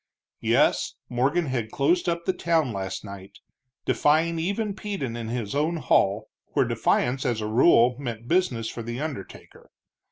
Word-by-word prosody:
Yes, -, -, +2 dB
Morgan 140 Hz, +8 st, +1 dB
had 120 Hz, -5 st, -2 dB
closed 175 Hz, +9 st, +1 dB
up 170 Hz, 0 st, -2 dB
the 190 Hz, -, +1 dB
town 165 Hz, -8 st, +1 dB
last 95 Hz, +1 st, -4 dB
night, 100 Hz, -1 st, -10 dB, 0.5 s
defying 160 Hz, +3 st, +2 dB
even 200 Hz, +5 st, -1 dB
Peden 195 Hz, -, -4 dB
in 115 Hz, -1 st, -5 dB
his 115 Hz, -3 st, -3 dB
own 155 Hz, +4 st, 0 dB
hall, 105 Hz, -8 st, +2 dB, 0.3 s
where -, -, +3 dB
defiance 130 Hz, +2 st, +1 dB
as 120 Hz, -5 st, 0 dB
a 105 Hz, -, -3 dB
rule 120 Hz, +2 st, +5 dB
meant 120 Hz, -4 st, -6 dB
business 135 Hz, -9 st, +1 dB
for 115 Hz, -, -6 dB
the 120 Hz, +2 st, -5 dB
undertaker. 145 Hz, -10 st, -8 dB
130 Hz, 155 wpm, -25 LUFS, 115-170 Hz, 0.5 s, rule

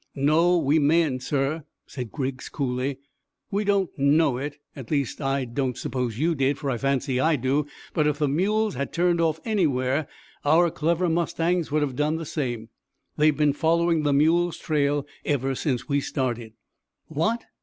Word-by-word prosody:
"No, 160 Hz, +6 st, +3 dB
we 155 Hz, -1 st, +3 dB
mayn't, 150 Hz, -3 st, +2 dB
sir," 145 Hz, +3 st, -1 dB, 0.2 s
said 125 Hz, -5 st, -7 dB
Griggs 130 Hz, -2 st, -4 dB
coolly. 130 Hz, -1 st, -2 dB, 0.5 s
"We 205 Hz, +1 st, 0 dB
don't 200 Hz, -3 st, +1 dB
know 140 Hz, -1 st, +3 dB
it 145 Hz, +2 st, -5 dB, 0.2 s
at 130 Hz, -5 st, -9 dB
least, 140 Hz, -1 st, -1 dB
I 135 Hz, -1 st, 0 dB
don't 125 Hz, 0 st, -2 dB
suppose 125 Hz, -3 st, -3 dB
you 165 Hz, +5 st, +2 dB
did, 135 Hz, -1 st, +1 dB
for 140 Hz, -3 st, -2 dB
I 120 Hz, -, -2 dB
fancy 135 Hz, -1 st, 0 dB
I 160 Hz, +4 st, +3 dB
do 140 Hz, +3 st, 0 dB, 0.3 s
but 150 Hz, -1 st, +2 dB
if 150 Hz, -1 st, 0 dB
the 150 Hz, -1 st, +1 dB
mules 210 Hz, +9 st, +1 dB
had 140 Hz, +2 st, -4 dB
turned 175 Hz, 0 st, +2 dB
off 160 Hz, -1 st, +1 dB
anywhere 145 Hz, -, +1 dB, 0.4 s
our 165 Hz, +3 st, +4 dB
clever 170 Hz, +4 st, 0 dB
mustangs 170 Hz, 0 st, 0 dB
would 150 Hz, 0 st, +1 dB
have 135 Hz, -3 st, -3 dB
done 150 Hz, +3 st, +1 dB
the 165 Hz, 0 st, -4 dB
same. 120 Hz, -7 st, -3 dB, 0.5 s
They've 150 Hz, -1 st, +3 dB
been 150 Hz, -2 st, +3 dB
following 165 Hz, +2 st, +2 dB
the 145 Hz, -1 st, +1 dB
mules' 165 Hz, +4 st, +3 dB
trail 145 Hz, -2 st, 0 dB, 0.2 s
ever 135 Hz, -2 st, 0 dB
since 130 Hz, -2 st, -2 dB
we 140 Hz, -1 st, +1 dB
started." 120 Hz, -5 st, -3 dB, 0.5 s
"What! 215 Hz, +10 st, -1 dB
145 Hz, 170 wpm, -25 LUFS, 135-165 Hz, 0.5 s, our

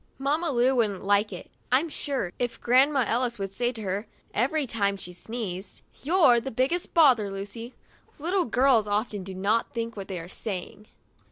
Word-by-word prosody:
Mamma 300 Hz, +5 st, 0 dB
Lu 255 Hz, -1 st, +3 dB
wouldn't 210 Hz, -5 st, 0 dB
like 205 Hz, +2 st, +2 dB
it, 180 Hz, -, -9 dB, 0.2 s
I'm 270 Hz, +6 st, +3 dB
sure, 275 Hz, -, -3 dB
if 245 Hz, -1 st, -2 dB
Grandma 265 Hz, +2 st, +4 dB
Ellis 240 Hz, 0 st, 0 dB
would 195 Hz, -1 st, -4 dB
say 240 Hz, +3 st, +1 dB
to 220 Hz, -2 st, -7 dB
her, 195 Hz, +2 st, -3 dB, 0.3 s
every 275 Hz, +6 st, +1 dB
time 200 Hz, -4 st, 0 dB
she 180 Hz, -1 st, -8 dB
sneezed: 195 Hz, -2 st, -6 dB, 0.2 s
"You're 285 Hz, -6 st, +5 dB
the 270 Hz, -, -5 dB
biggest 270 Hz, +11 st, -1 dB
bother, 255 Hz, -11 st, +5 dB
Lucy!' 200 Hz, +5 st, -6 dB, 0.4 s
Little 355 Hz, +5 st, 0 dB
girls 245 Hz, -2 st, +3 dB
often 205 Hz, -1 st, -1 dB
do 190 Hz, 0 st, -7 dB
not 210 Hz, +6 st, 0 dB
think 230 Hz, 0 st, -3 dB
what 195 Hz, -2 st, -6 dB
they 185 Hz, -3 st, -4 dB
are 165 Hz, -, -8 dB
saying. 200 Hz, +1 st, -6 dB
230 Hz, 175 wpm, -27 LUFS, 200-265 Hz, 0.4 s, You're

